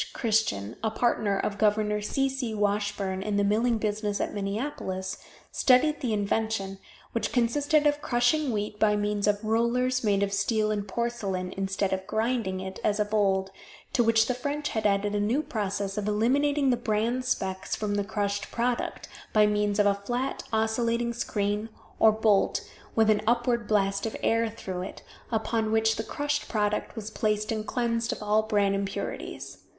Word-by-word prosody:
Christian, 210 - 0
a 220 - +2
partner 215 -3 +1
of 200 0 -2
Gov. 210 0 +2
C. 270 +6 +1
C. 260 -4 -3
Washburn 205 -2 -1
in 205 0 -1
the 205 - +3
milling 225 +4 +2
business 210 -1 -1
at - - -2
Minneapolis, 195 -3 -3 0.3
studied 285 +4 +3
the 245 - -1
invention, 205 -1 -1 0.3
which 230 - -1
consisted 290 +5 +2
of 295 0 +2
crushing 245 +5 +2
the - - 0
wheat 210 -1 -3
by 210 -1 +4
means 205 0 0
of 205 +1 +1
rollers 240 +3 +1
made 200 -2 +2
of 200 0 -1
steel 215 +2 +1
and 205 -1 -2
porcelain, 195 -5 -2
instead 195 0 -1
of 190 0 -3
grinding 220 -4 0
it, 190 0 -6
as 210 0 +1
of 210 0 -1
old, 195 -2 +2 0.4
to 240 - +4
which 225 -1 +4
the 250 - 0
French 285 +4 -3
had 220 -1 +1
added 205 +1 +1
a 205 - +1
new 235 +9 +1
process 200 -4 -2
of 205 - -3
eliminating 275 +6 +2
the 245 - +2
bran 230 +2 0
specs 190 -7 -2
from 210 -1 -2
the 205 0 +1
crushed 205 -1 -2
product, 240 +1 -2 0.3
by 215 -1 +6
means 210 -1 +1
of 205 - +4
a 200 - +5
flat 240 +7 -3
oscillating 230 +2 +1
screen 210 -1 -1 0.3
or 220 - +7
bolt 215 -2 +2 0.3
with 220 -1 +5
an 210 - +2
upward 235 -1 +1
blast 200 0 +1
of 220 - -5
air 230 0 +2
through 190 -4 -6
it, 185 - -7 0.3
upon 220 -1 0
which 220 0 +3
the 220 - -2
crushed 290 +5 -2
product 210 0 -1
was 220 -1 -6
placed 215 0 0
and 215 -1 -3
cleansed 235 -1 0
of - - -5
all 210 +1 +3
bran 205 -2 +1
impurities. 195 0 -4
215 Hz, 175 wpm, -27 LUFS, 205-235 Hz, 0.4 s, or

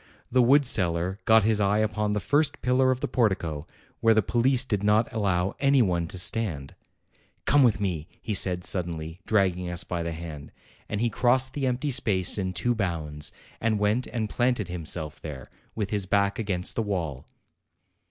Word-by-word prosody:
The 130 +1 +4
wood 140 +4 +5
seller 90 -3 +1
got 110 -1 +5
his 110 0 +2
eye 100 +1 +2
upon 105 -1 0
the 105 - 0
first 145 +7 0
pillar 130 +1 +3
of 130 0 0
the - - -1
portico, 90 - -1 0.3
where 115 -1 +4
the 110 - +3
police 125 +4 +2
did 105 -6 -2
not 105 +2 +2
allow 95 -4 0
any 140 -2 +4
one 85 -4 0
to 95 - -6
stand; 85 -6 -1 0.7
"Come 145 - +4
with 120 -6 +3
me," 85 -6 -2
he 110 - -4
said 90 -2 0
suddenly, 80 -2 -2
dragging 95 -4 +1
us 85 0 -1
by 85 -2 -4
the 85 0 -3
hand; 80 -3 -8 0.4
and 105 - -2
he 120 -1 +1
crossed 130 +3 +2
the 140 -2 -1
empty 130 +3 -1
space 105 -7 +2
'in 95 -1 -2
two 120 +5 0
bounds, 80 -8 -3 0.3
and 110 -1 0
went 105 +5 0
and 110 -3 -3
planted 120 -4 0
himself 80 -3 -4
there, 70 -5 -8 0.2
.with 105 -3 -3
his 100 -3 0
back 100 +1 +1
against 95 -5 0
the - - -1
wall. 85 - -3
100 Hz, 180 wpm, -26 LUFS, 90-115 Hz, 0.7 s, wood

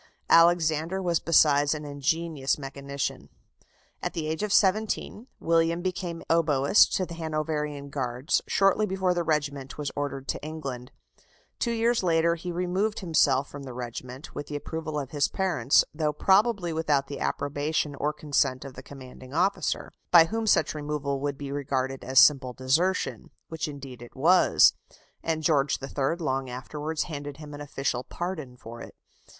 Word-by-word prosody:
Alexander 165 +1 +4
was 175 -3 +1
besides 145 -2 +4
an 150 -1 -6
ingenious 145 0 -1
mechanician. 140 0 -5 0.7
At - - -3
the 160 - -3
age 160 +3 -2
of 210 -1 -2
seventeen, 215 +3 +1
William 165 +1 +1
became 180 -2 -3
oboist 155 0 +4
to 185 - 0
the 170 - -9
Hanoverian 155 -3 -3
Guards, 130 +1 -1
shortly 195 +2 +3
before 190 -2 0
the 175 - 0
regiment 145 -4 -2
was 145 -2 -3
ordered 140 -1 -4
to - - -3
England. 135 -5 -6 0.7
Two 235 - 0
years 230 +1 +2
later 170 -2 +2
he 170 +1 -5
removed 180 +5 -1
himself 145 -6 +2
from 145 - -8
the 130 -3 -8
regiment, 125 +2 -7
with 145 - -6
the 150 - -6
approval 155 +1 -4
of 140 -2 -6
his 145 -2 +1
parents, 180 -7 +2
though 155 -1 0
probably 195 +1 +2
without 150 -4 +1
the 140 - -7
approbation 145 +1 -1
or 145 +2 -1
consent 140 -3 0
of 135 - -8
the - - -9
commanding 130 0 -11
officer, 190 +4 0 0.2
by 170 -2 +8
whom 225 +5 -3
such - - +3
removal 145 -2 -3
would 140 0 -3
be 140 -1 -6
regarded 135 -2 -2
as 130 +1 +4
simple 135 -4 +5
desertion, 155 +10 0 0.2
which 160 -2 -3
indeed 140 -4 -9
it 120 - -12
was; 170 +7 +5 0.5
and 160 -1 -2
George 145 -3 +2
III. 135 +2 -1
long 135 -6 -2
afterwards 150 +5 -4
handed 145 -3 -7
him 150 -1 -10
an 145 - -8
official 135 -3 -2
pardon 155 -8 -5
for 115 0 -10
it. - - -11
150 Hz, 160 wpm, -27 LUFS, 140-170 Hz, 0.7 s, by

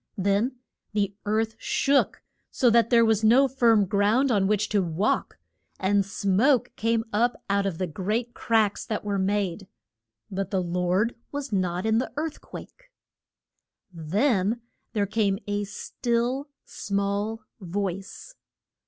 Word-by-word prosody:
Then 200 +6 +1 0.4
the 200 -1 0
earth 220 +1 +1
shook, 275 0 +1 0.3
so 245 -4 +3
that 235 0 +4
there 230 -2 +5
was 220 -1 +2
no 250 +5 +6
firm 230 -6 +3
ground 210 +8 +2
on 200 -4 +2
which 210 0 +1
to 205 -2 +2
walk; 175 +4 -1 0.4
and 200 +1 +2
smoke 205 +7 +2
came 225 0 +1
up 235 +3 +1
out 200 0 +2
of 180 -4 -3
the 185 - -1
great 210 +9 -2
cracks 220 -3 +1
that 215 - -3
were 200 -1 -1
made. 195 -1 -1 0.6
But 195 0 -3
the 190 -3 0
Lord 180 +6 0 0.2
was 285 -4 -5
not 180 0 0
in 220 0 +3
the 255 - -3
earth 310 0 -3
quake. - - -12 1.0
Then 200 - 0 0.3
there 205 -3 +1
came 200 -1 +1
a 205 0 -2
still, 240 +6 -2 0.2
small 200 +2 -2 0.2
voice. 195 - -5
210 Hz, 135 wpm, -26 LUFS, 195-230 Hz, 1.0 s, no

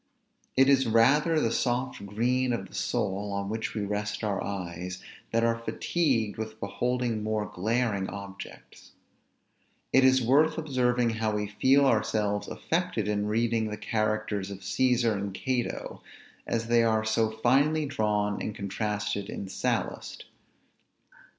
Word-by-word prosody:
It 135 0 +6
is 135 -2 +4
rather 145 +8 +4
the 115 - +1
soft 125 -2 -1
green 125 +5 +1
of 115 - -3
the - - -20
soul 105 -3 -1
on 100 0 -2
which 110 +1 -3
we 105 -2 -1
rest 105 +1 -3
our 100 -2 -1
eyes, 90 -2 -5 0.3
that 115 0 +2
are 115 0 +2
fatigued 115 -4 0
with 110 0 -5
beholding 120 +2 -1
more 110 0 -1
glaring 105 0 -1
objects. 100 0 -10 1.0
It 135 - +6
is 130 0 +6
worth 145 +6 +3
observing 125 -6 +1
how 110 -1 -1
we 105 0 -1
feel 135 +7 +3
ourselves 105 -4 +1
affected 165 - -1
in 105 0 0
reading 115 0 +1
the 105 - -5
characters 110 -2 -1
of 100 -1 -8
Cæsar 125 -2 +2
and 100 -1 -4
Cato, 125 0 -3 0.5
as 115 0 -1
they 115 0 +4
are 110 -1 +2
so 110 0 +2
finely 135 +8 +2
drawn 105 -5 0
and 105 - -4
contrasted 105 0 -3
in 100 - -5
Sallust. - - -3
110 Hz, 140 wpm, -28 LUFS, 105-125 Hz, 1.0 s, It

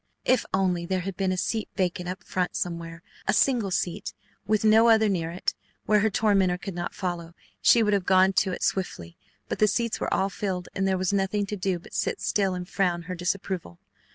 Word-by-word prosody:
If 255 - +2
only 180 -3 0
there 185 0 0
had 190 +1 -5
been 190 0 0
a 185 - -1
seat 220 +4 -2
vacant 180 -2 -1
up 180 0 -6
front 180 -1 -2
somewhere, 170 -1 -4 0.2
a 195 - +3
single 235 -4 +2
seat 180 +1 -2 0.3
with 215 0 +2
no 220 +2 +6
other 220 -1 +5
near 170 -5 -1
it, 175 +2 -2 0.3
where 210 0 +4
her 220 +2 +2
tormentor 195 -4 +2
could 185 +2 -6
not 175 0 -4
follow, 175 -3 -4 0.3
she 235 - +6
would 210 -1 +2
have 195 -3 0
gone 190 0 +5
to 190 0 +2
it - - -4
swiftly, 85 - -2 0.3
but - - -4
the 215 - +5
seats 230 +1 0
were - - -2
all 195 +1 +1
filled 185 -3 -3
and 195 0 0
there 190 -1 +1
was 185 +1 0
nothing 200 +1 +1
to 210 - -4
do 185 -2 -1
but 170 - -15
sit - - -1
still 195 -3 0
and 180 -1 -5
frown 180 -3 0
her 180 +2 -5
disapproval. 180 - -3
190 Hz, 215 wpm, -26 LUFS, 180-205 Hz, 0.3 s, no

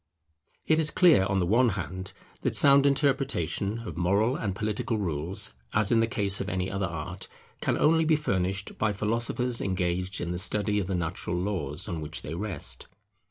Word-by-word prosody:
It 160 0 +3
is 155 -1 +3
clear, 160 - +5
on 95 -1 0
the 90 - +1
one 115 +7 +3
hand, 95 +1 -5 0.3
that - - 0
sound 140 0 +6
interpretation 135 - 0
of 80 - -7
moral 100 +8 +2
and 100 -7 -3
political 110 +2 -2
rules, 85 -5 -1 0.2
as 105 -2 +2
in 115 - +4
the 115 - +2
case 100 -5 0
of 100 - -3
any 95 -1 -2
other 100 -1 -1
art, 80 -3 -6 0.3
can - - 0
only 160 +1 +4
be 160 0 +4
furnished 100 -8 -2
by 110 -1 +1
philosophers 115 +4 0
engaged 90 0 -1
in 85 - -3
the 90 - -2
study 105 +1 +1
of 95 - -3
the 95 - -1
natural 85 0 -3
laws 90 -4 -3
on 85 -2 -4
which 75 +1 -4
they 75 - -5
rest. 90 -3 -5
100 Hz, 185 wpm, -27 LUFS, 90-115 Hz, 0.3 s, sound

